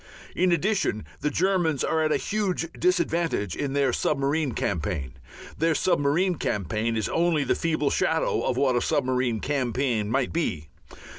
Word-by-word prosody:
In 180 Hz, 0 st, +2 dB
addition 175 Hz, -, 0 dB
the 150 Hz, -, 0 dB
Germans 170 Hz, -3 st, +1 dB
are 160 Hz, -, +1 dB
at 155 Hz, -1 st, +1 dB
a -, -, +3 dB
huge 200 Hz, -5 st, -1 dB
disadvantage 170 Hz, -, 0 dB
in 140 Hz, -2 st, -3 dB
their 140 Hz, -3 st, +2 dB
submarine 140 Hz, 0 st, 0 dB
campaign. 75 Hz, -, -2 dB, 0.5 s
Their 165 Hz, 0 st, +2 dB
submarine 175 Hz, +2 st, +1 dB
campaign 110 Hz, +4 st, -1 dB
is 110 Hz, -, -1 dB
only 165 Hz, -3 st, +1 dB
the -, -, +1 dB
feeble 155 Hz, -3 st, 0 dB
shadow 160 Hz, 0 st, +1 dB
of 125 Hz, -, -1 dB
what 130 Hz, -2 st, +2 dB
a 120 Hz, -, +2 dB
submarine 125 Hz, -4 st, 0 dB
campaign 125 Hz, -5 st, -1 dB
might 130 Hz, +2 st, 0 dB
be. 80 Hz, -, -2 dB
145 Hz, 150 wpm, -26 LUFS, 120-165 Hz, 0.5 s, a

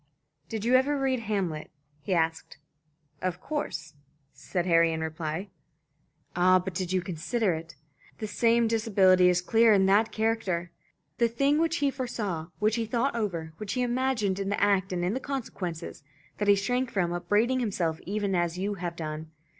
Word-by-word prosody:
"Did 220 Hz, -2 st, -4 dB
you 245 Hz, -, +2 dB
ever 270 Hz, +3 st, +4 dB
read 265 Hz, -2 st, +1 dB
'Hamlet'?" 195 Hz, -9 st, -2 dB, 0.3 s
he 150 Hz, -, -6 dB
asked. 160 Hz, -2 st, 0 dB, 0.6 s
"Of 185 Hz, -1 st, -2 dB
course," 155 Hz, -, -4 dB, 0.4 s
said 175 Hz, -2 st, -3 dB
Harry, 170 Hz, -2 st, +4 dB
in 160 Hz, 0 st, -3 dB
reply. 160 Hz, +4 st, -4 dB, 0.9 s
"Ah, 185 Hz, +1 st, +5 dB
but 185 Hz, 0 st, -4 dB
did 180 Hz, 0 st, -3 dB
you 185 Hz, -1 st, +1 dB
consider 185 Hz, +4 st, -1 dB
it? 160 Hz, -1 st, -7 dB, 0.4 s
The 215 Hz, -, -4 dB
same 230 Hz, +3 st, +2 dB
disability 195 Hz, -5 st, +4 dB
is 180 Hz, 0 st, +2 dB
clear 225 Hz, +4 st, +4 dB
in 195 Hz, -1 st, +4 dB
that 205 Hz, +3 st, +3 dB
character. 205 Hz, -6 st, -1 dB, 0.5 s
The 235 Hz, -, +4 dB
thing 275 Hz, +6 st, +2 dB
which 330 Hz, 0 st, +1 dB
he 275 Hz, -, +2 dB
foresaw, 215 Hz, -, -3 dB
which 215 Hz, +2 st, +1 dB
he 225 Hz, -1 st, -1 dB
thought 245 Hz, +3 st, 0 dB
over, 170 Hz, -8 st, -3 dB
which 215 Hz, -2 st, -4 dB
he 250 Hz, -, 0 dB
imagined 240 Hz, -6 st, 0 dB
in 195 Hz, 0 st, -2 dB
the 200 Hz, -, -1 dB
act 195 Hz, -2 st, +2 dB
and 175 Hz, -1 st, -1 dB
in 185 Hz, -, 0 dB
the 260 Hz, -, -1 dB
consequence 200 Hz, -, -4 dB, 0.6 s
that 205 Hz, -, 0 dB
he 205 Hz, -, +7 dB
shrank 245 Hz, +6 st, 0 dB
from, 175 Hz, -5 st, 0 dB
upbraiding 205 Hz, +9 st, +1 dB
himself 180 Hz, -9 st, -1 dB
even 200 Hz, 0 st, -1 dB
as 175 Hz, -1 st, 0 dB
you 200 Hz, +3 st, -1 dB
have 175 Hz, -1 st, -4 dB
done. 155 Hz, -1 st, -5 dB
195 Hz, 175 wpm, -28 LUFS, 175-230 Hz, 0.9 s, he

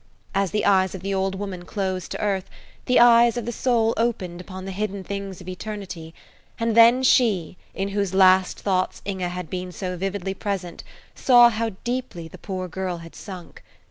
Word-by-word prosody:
As 195 Hz, -1 st, +1 dB
the 210 Hz, -, -1 dB
eyes 190 Hz, -2 st, +3 dB
of 185 Hz, -, -7 dB
the 195 Hz, 0 st, -2 dB
old 190 Hz, 0 st, 0 dB
woman 190 Hz, -3 st, -5 dB
closed 185 Hz, -1 st, -3 dB
to -, -, -5 dB
earth, 195 Hz, -2 st, -1 dB, 0.4 s
the 250 Hz, -, +4 dB
eyes 235 Hz, 0 st, +6 dB
of 240 Hz, -, -3 dB
the 240 Hz, -, -2 dB
soul 230 Hz, -2 st, +1 dB
opened 185 Hz, -7 st, -1 dB
upon 185 Hz, 0 st, -9 dB
the 195 Hz, -, -5 dB
hidden 200 Hz, 0 st, -3 dB
things 200 Hz, -1 st, -5 dB
of 180 Hz, -, -12 dB
eternity, 185 Hz, -4 st, -7 dB, 0.4 s
and 230 Hz, -1 st, 0 dB
then 235 Hz, +3 st, +7 dB
she, 210 Hz, -10 st, +3 dB, 0.2 s
in 195 Hz, +1 st, -2 dB
whose 200 Hz, -2 st, -1 dB
last 185 Hz, -1 st, +4 dB
thoughts 185 Hz, -2 st, -1 dB
Inge 190 Hz, -2 st, -4 dB
had 180 Hz, -1 st, -3 dB
been 180 Hz, 0 st, -5 dB
so 180 Hz, +2 st, -4 dB
vividly 195 Hz, +1 st, -3 dB
present, 190 Hz, -4 st, -4 dB, 0.3 s
saw 240 Hz, -2 st, +6 dB
how 225 Hz, -1 st, -2 dB
deeply 240 Hz, -9 st, -4 dB
the -, -, -13 dB
poor 185 Hz, -2 st, -4 dB
girl 180 Hz, 0 st, -4 dB
had 165 Hz, 0 st, -11 dB
sunk. 185 Hz, -4 st, -10 dB
195 Hz, 185 wpm, -23 LUFS, 185-215 Hz, 0.4 s, then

